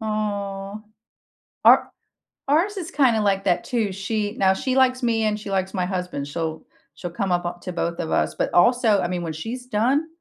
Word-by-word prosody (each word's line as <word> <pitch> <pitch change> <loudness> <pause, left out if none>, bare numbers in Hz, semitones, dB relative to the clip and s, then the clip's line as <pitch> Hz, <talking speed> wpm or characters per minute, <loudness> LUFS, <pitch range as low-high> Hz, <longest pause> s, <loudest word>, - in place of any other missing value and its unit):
Aw, 205 -2 -3 0.8
our - - +6 0.6
ours 345 +9 +2
is 360 -1 -5
kinda 245 -9 +3
like 195 -1 +1
that 180 -3 +2
too. 225 -5 -1
She 205 +2 -2
now 190 -1 +4
she 260 +6 -2
likes 255 -1 +3
me 225 -2 +1
and 215 -1 0
she 205 - -8
likes 190 -1 -1
my 185 -3 0
husband. 180 -6 -3
She'll 160 +1 -4 0.3
she'll 175 - -6
come 195 -1 -2
up 175 0 +1
o 175 - -3
to 180 - -5
both 170 0 -2
of 160 - -3
us, - - +1
but - - -2
also, 220 +2 +4
I - - 0
mean, 175 -1 -3
when 160 -2 -4
she's 235 +10 -6
done, 255 +8 +1
205 Hz, 200 wpm, -23 LUFS, 180-235 Hz, 0.8 s, our